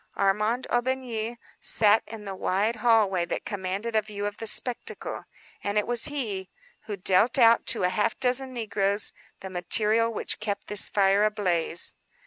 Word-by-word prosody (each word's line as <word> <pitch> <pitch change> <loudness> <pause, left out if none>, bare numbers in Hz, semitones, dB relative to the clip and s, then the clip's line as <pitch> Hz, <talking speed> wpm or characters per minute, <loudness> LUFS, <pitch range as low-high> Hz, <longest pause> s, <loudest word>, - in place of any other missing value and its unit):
Armand 210 +5 +1
Aubigny 240 -2 -2 0.2
sat 215 0 +4
in 215 -1 -9
the 195 - -5
wide 200 +4 -1
hallway 215 -6 +3
that - - -5
commanded 200 +2 -4
a 215 - +4
view 205 -1 -6
of 205 0 -4
the 225 - -5
spectacle; 245 +3 -1 0.4
and 205 +1 -2
it 210 - +2
was 240 -1 +2
he 215 -11 -3 0.4
who 210 -2 -5
dealt 190 +7 +2
out 230 -2 +5
to - - +2
a 180 - +3
half 205 +4 -1
dozen 260 +1 +1
negroes 205 -4 0 0.3
the 190 - -7
material 215 +5 +1
which 225 - -1
kept 205 -1 -4
this 210 0 +3
fire 200 0 +3
ablaze. 180 -6 0
210 Hz, 160 wpm, -26 LUFS, 195-230 Hz, 0.4 s, out